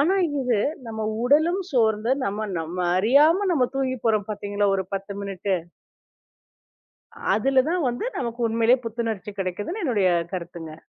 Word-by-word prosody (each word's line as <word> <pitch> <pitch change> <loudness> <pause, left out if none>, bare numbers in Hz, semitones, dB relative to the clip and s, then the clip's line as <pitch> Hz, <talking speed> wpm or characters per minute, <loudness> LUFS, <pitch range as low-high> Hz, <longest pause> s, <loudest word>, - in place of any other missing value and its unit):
ஆனா 345 +7 +3 0.3
இது, 245 -5 +1 0.3
நம்ம 220 -1 -5 0.2
உடலும் 320 +8 +3
சோர்ந்து 225 -1 +2
நம்ம 210 +2 -3
நம்ம 165 +3 -6 0.2
அறியாம 300 - +4
நம்ம 260 -6 +3
தூங்கி 260 -1 0
போறோம் 215 -2 +1
பாத்தீங்களா, 205 0 -1
ஒரு 190 - -2
10 195 +1 -4
மினிட்டு! 195 -1 -2 1.8
அதுல 260 +4 +3
தான் 345 -3 0
வந்து, 240 - -3
நமக்கு 235 -1 -4
உண்மையிலேயே 230 +3 +3
புத்துணர்ச்சி 225 -3 -3
கெடைக்குதுன்னு 205 - -3
என்னுடைய 205 -9 +2 0.2
கருத்துங்க. 170 -3 -7
225 Hz, 130 wpm, -24 LUFS, 200-260 Hz, 1.8 s, அறியாம